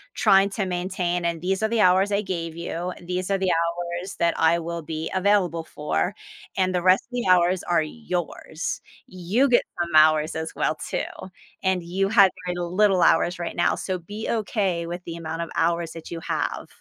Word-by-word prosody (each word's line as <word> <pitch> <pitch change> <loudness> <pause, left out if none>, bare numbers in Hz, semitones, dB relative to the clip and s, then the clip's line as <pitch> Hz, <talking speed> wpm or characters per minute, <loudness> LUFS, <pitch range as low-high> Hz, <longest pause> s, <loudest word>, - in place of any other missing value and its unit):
trying 195 +1 +5
to 195 -1 -2
maintain, 180 -1 -2
and 170 -1 -1
these 190 +3 -1
are 220 - +4
the 230 -1 +1
hours 190 +2 +4
I 200 +1 +2
gave 170 -4 -4
you, 170 +1 -4
"These 180 +2 -3
are 195 - +3
the 190 -1 +1
hours 175 +2 -2
that 170 0 +2
I 165 +1 +4
will 170 0 -4
be 160 +1 -4
available 185 -4 +2
for," 150 +6 -2 0.4
and 185 -1 +1
the 180 - +1
rest 185 +1 +5
of - - -49
the 245 -4 -2
hours 180 0 +4
are 170 -2 +2
yours. 175 -3 -4 0.3
You 185 +9 +1
get 240 - +4 0.2
some 170 -2 -2
hours 155 0 +5
as 160 0 -4
well, 155 - 0
too, - - -3 0.6
and 190 -2 +1
you 190 +3 -1
had 200 -4 +6
kinda 180 0 -2
little 190 +1 +3
hours 175 +2 +3
right 170 - -4
now, 175 - +2
so 185 -1 -3
be 205 +6 -6
okay 195 -6 -1
with 175 +1 -6
the 170 - -6
amount 165 0 -5
of - - -8
hours 170 0 +1
that 165 -1 -10
you 170 - -4
have. - - -2
175 Hz, 195 wpm, -24 LUFS, 170-190 Hz, 0.6 s, had